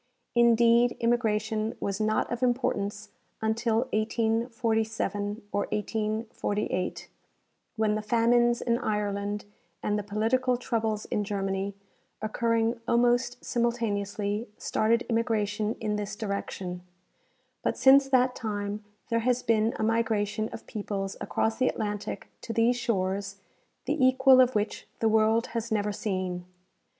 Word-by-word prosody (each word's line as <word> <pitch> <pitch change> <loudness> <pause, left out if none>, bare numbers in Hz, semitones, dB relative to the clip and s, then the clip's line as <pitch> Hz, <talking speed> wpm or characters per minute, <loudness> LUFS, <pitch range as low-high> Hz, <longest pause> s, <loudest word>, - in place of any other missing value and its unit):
Indeed, 235 0 +4
immigration 220 -2 0
was 200 +1 -2
not 215 0 +1
of 240 0 -3
importance 240 -5 0 0.3
until 220 +1 +1
1847 220 -1 0
or 205 - 0
1848, 210 -3 -2 0.7
when 220 -2 +1
the 215 - -1
famines 235 +2 +3
in 235 0 +1
Ireland 205 -2 -2 0.4
and 210 0 0
the - - -4
political 230 +5 +1
troubles 220 -3 -1
in 210 - -1
Germany, 195 -1 -2 0.4
occurring 230 +1 0
almost 245 +1 +2
simul 235 0 +1
taneously, 205 -1 -2
started 230 +2 +1
immigration 220 -2 0
in 210 -2 -2
this 205 0 -4
direction; 195 -3 -4 0.8
but - - -1
since 270 +1 +6
that 255 -1 +4
time 210 -2 -3 0.3
there 230 - +2
has 250 +1 +1
been 225 0 +2
a - - -2
migration 220 -1 0
of - - -9
peoples 200 -2 -4
across 220 0 0
the 255 - +3
Atlantic 210 -3 -3
to - - -5
these 230 +2 +3
shores 195 -4 -1 0.5
the 290 0 0
equal 260 0 +6
of 255 -1 +3
which 210 0 -2
the 225 - +1
world 220 +1 +3
has 230 0 -3
never 210 -1 +1
seen. 185 -4 -3
220 Hz, 125 wpm, -28 LUFS, 205-235 Hz, 0.8 s, since